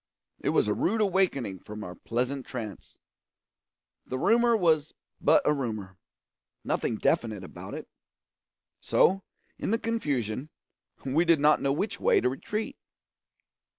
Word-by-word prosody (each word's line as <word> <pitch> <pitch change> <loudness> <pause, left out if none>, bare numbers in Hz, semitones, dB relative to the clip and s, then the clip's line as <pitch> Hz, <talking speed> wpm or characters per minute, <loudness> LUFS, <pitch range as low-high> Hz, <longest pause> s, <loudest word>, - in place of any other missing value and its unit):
It - - -1
was - - +3
a 105 - +2
rude 215 - 0
awakening 180 - +1
from 105 +3 -8
our 90 - -7
pleasant 125 +7 -2
trance. 110 -5 -7 1.1
The 130 - -4
rumour 235 - +4
was 160 -5 +2 0.3
but 300 - +5
a - - +4
rumour 110 -9 -4 0.6
nothing 115 - -1
definite 110 -4 0
about - - -8
it; - - -7 0.9
so, 195 +1 +3 0.4
in - - -2
the 225 - +3
confusion, 145 - -2 0.6
we 140 +5 +3
did 165 -3 +4
not 150 +1 +4
know 140 - +1
which 175 +10 -2
way - - +4
to 125 - +2
retreat. 210 +11 -4
140 Hz, 135 wpm, -28 LUFS, 115-190 Hz, 1.1 s, but